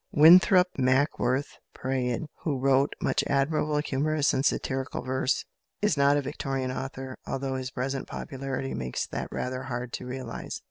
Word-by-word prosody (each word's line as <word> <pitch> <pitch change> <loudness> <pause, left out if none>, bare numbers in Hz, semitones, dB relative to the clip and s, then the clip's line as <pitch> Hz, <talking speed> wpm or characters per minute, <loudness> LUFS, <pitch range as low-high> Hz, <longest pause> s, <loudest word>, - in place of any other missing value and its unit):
Winthrop 180 +4 +7
Mackworth 130 0 +1 0.2
Praed, 125 -1 -1 0.2
who 145 -5 -1
wrote 135 +1 +3
much - - +1
admirable 150 +2 +1
humorous 150 0 +1
and 130 - +1
satirical 130 -2 -1
verse, 130 +1 0 0.3
is 210 -5 +2
not 140 0 +4
a 145 - 0
Victorian 135 -2 -3
author, 130 0 -6
although 135 0 -2
his 130 -1 -3
present 135 +1 -3
popularity 135 -1 -4
makes 65 -1 -3
that - - -5
rather 130 0 -3
hard 125 -1 -5
to - - -5
realise. 125 -2 -5
135 Hz, 145 wpm, -27 LUFS, 130-145 Hz, 0.3 s, Winthrop